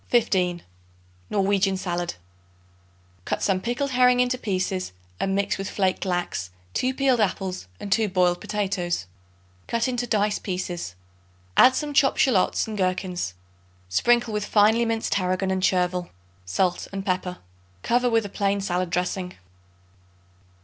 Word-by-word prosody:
15. 185 -7 +1 0.7
Norwegian 195 -1 +2
Salad. 175 - -3 1.1
Cut - - -2
some 190 -2 +1
pickled 245 +5 -2
herring 250 0 +4
into 250 0 +2
pieces 185 - -2 0.3
and 195 0 0
mix 200 0 0
with 195 - -3
flaked 190 -1 0
lax, 175 - -2 0.2
2 255 +1 0
peeled 265 -3 +2
apples 190 - -1
and 200 - -7
2 220 +1 +3
boiled 180 -1 +2
potatoes. 190 - -2 0.6
Cut 235 +1 0
into 245 -1 -2
dice 210 -2 +1
pieces; 180 - -4 0.6
add 260 +1 +7
some 295 -1 -2
chopped 275 -1 +4
shallots 220 -9 +3
and 215 -2 -5
gherkins; 185 - -1 0.5
sprinkle 235 - +2
with 210 -1 -1
finely 215 +3 +4
minced 225 -1 -1
tarragon 185 0 0
and 190 0 0
chervil, 180 -1 +1 0.4
salt 175 - 0
and 195 -1 -5
pepper. 180 -1 -1 0.5
Cover 245 +1 +2
with 225 -2 +2
a - - -2
plain 200 0 0
salad 185 -2 -1
dressing. 180 +1 -2
195 Hz, 135 wpm, -25 LUFS, 180-225 Hz, 1.1 s, add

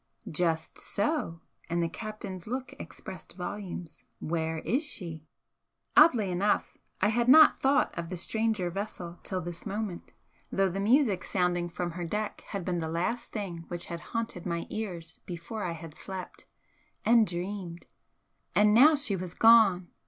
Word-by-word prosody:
"Just 160 0 0
so!" 200 - -1 0.3
And 170 0 +1
the - - +1
captain's 200 -1 -7
look 255 +3 -4
expressed - - -9
volumes 180 -2 -6
"Where 160 0 -2
is 250 - 0
she?" 165 - -4 0.7
Oddly 250 - +6
enough, 195 +4 +1 0.3
I 205 - +4
had 235 +2 +1
not 310 +5 +8
thought 275 +2 +2
of 170 -1 -4
the 180 - -4
stranger 215 -1 0
vessel 180 -3 -6
till 185 -2 -3
this 175 0 -6
moment, 205 -3 -5 0.4
though 195 0 +2
the 190 +2 -3
music 215 -2 +3
sounding 175 -2 0
from 175 0 -3
her 175 +1 -5
deck 210 +5 -3
had 195 -4 -4
been 175 -2 -1
the 160 - -2
last 185 +9 -2
thing 175 -6 -5
which 175 0 -5
had 170 -1 -5 0.2
haunted 225 -6 -3
my 170 -1 -2
ears 175 -7 -5
before 180 +5 -5
I 170 - -2
had 165 -1 -9
slept 190 +3 -8 0.6
and 230 -1 +6
dreamed! 175 0 -5 0.7
And 210 +1 +5
now 290 +8 +8
she 275 -8 0
was 180 -1 -6
gone! 220 -6 +6
185 Hz, 155 wpm, -29 LUFS, 170-220 Hz, 0.7 s, not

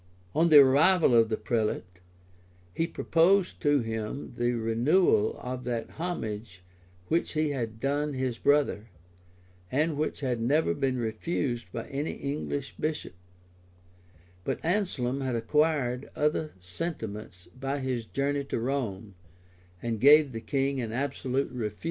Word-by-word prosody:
[] 90 0 -31
On 165 +2 +4
the 155 - +9
arrival 150 +3 +5
of 115 -1 +5
the 110 - 0
prelate, 105 -6 -2 0.7
he 165 - 0
proposed 180 +4 +2
to 145 -3 +3
him 110 +4 -4
the 120 +1 +1
renewal 115 - +2
of 125 0 -5
that 120 -2 -3
homage 110 - -5 0.4
which 165 - 0
he 155 -1 +1
had 115 -5 -4
done 145 +3 0
his 130 -3 -2
brother, 140 -6 +2 0.8
and 155 +3 +1
which 150 0 -2
had 125 -4 -1
never 145 +7 +2
been 135 -2 -1
refused 120 +2 -2
by 115 - -5
any 140 +3 -2
English 140 -1 -4
bishop; 155 -8 -3 1.3
but - - -2
Anslem 155 -9 0
had 130 -2 -1
acquired 135 +1 +1
other 150 +1 0
sentiments 105 - -6
by 135 +2 -2
his 130 -3 -2
journey 140 +3 -1
to 135 - -2
Rome, 115 -6 -3 0.7
and 115 -3 -2
gave 145 0 +7
the 115 -2 -5
king 135 +2 -1
an 115 -2 -4
absolute 135 +1 -2
refusal. 105 -4 -4
130 Hz, 135 wpm, -28 LUFS, 115-150 Hz, 1.3 s, the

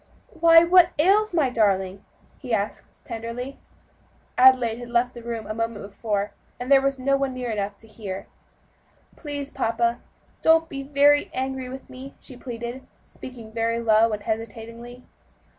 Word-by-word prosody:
"Why! 330 -1 +7
what 355 0 +5
ails 405 +7 +3
my 305 -7 +1
darling?" 195 -4 +1 0.4
he 250 -5 -1
asked 205 0 -5
tenderly. 230 +4 -6 0.8
Adelaide 250 -3 +5
had 240 -1 -8
left 240 +1 +1
the 240 - -10
room 230 -2 -5
a 215 - -4
moment 230 -2 -3
before, 205 0 -3 0.3
and 250 +3 -5
there 275 -1 +7
was 275 0 0
no 275 +2 +1
one 275 -1 -1
near 250 -2 -3
enough 200 -1 -3
to 225 - -18
hear. 200 -3 -7 0.9
"Please, 290 -2 -6
papa, 235 +1 0 0.4
don't 325 0 +4
be 275 - -5
very 285 +1 +3
angry 260 0 -3
with 265 +1 -9
me," 265 +1 -11
she 260 - -13
pleaded, 240 0 -6 0.2
speaking 235 -4 -11
very 230 +1 -1
low 225 0 +4
and 210 -1 -4
hesitatingly. 230 +2 -6
240 Hz, 155 wpm, -24 LUFS, 225-275 Hz, 0.9 s, Why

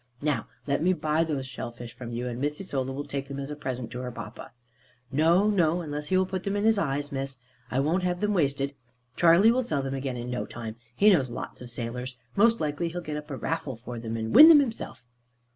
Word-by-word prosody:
Now 150 -2 0 0.2
let 140 0 0
me 185 +3 +3
buy 155 -2 +1
those 145 -5 -2
shellfish 120 -2 -7
from 120 -2 -8
you, 120 +1 -3
and 120 0 -4
Miss 150 +1 -1
Isola 135 -8 -3
will 140 +2 -4
take 140 -1 -4
them 140 - -6
as 140 +1 -5
a - - -4
present 130 -5 -5
to 125 - -5
her 125 -1 -4
papa." 110 -2 -9 0.6
"No, 165 +8 +4
no, 175 -4 +2
unless 150 -2 -5
he 185 - +2
will 185 - +3
put 185 0 -3
them 200 +1 -2
in 205 - 0
his 220 -1 +4
eyes, 145 -2 -1
Miss. 135 -1 -4 0.3
I 135 +1 +1
won't 165 +6 +1
have 180 -1 -1
them 210 +1 +1
wasted. 140 -5 0 0.4
Charley 175 +6 +6
will 255 +2 +2
sell 155 - -1
them 135 0 -3
again 135 -2 -3
in 120 +1 -5
no 125 - -3
time. 110 -2 -7 0.2
He 210 +1 +6
knows 140 -9 +3
lots 120 - -7
of 125 - -8
sailors. 125 +2 -5 0.2
Most 230 +3 +4
likely 155 +2 -1
he'll 175 +2 -4
get 155 -3 -5
up 150 0 -8
a 135 - -4
raffle 160 -4 -3
for 120 +1 -7
them, 115 0 -4
and 110 0 -3
win 315 - +11
them 315 -3 +9
himself." 235 - -3
145 Hz, 240 wpm, -27 LUFS, 125-175 Hz, 0.6 s, win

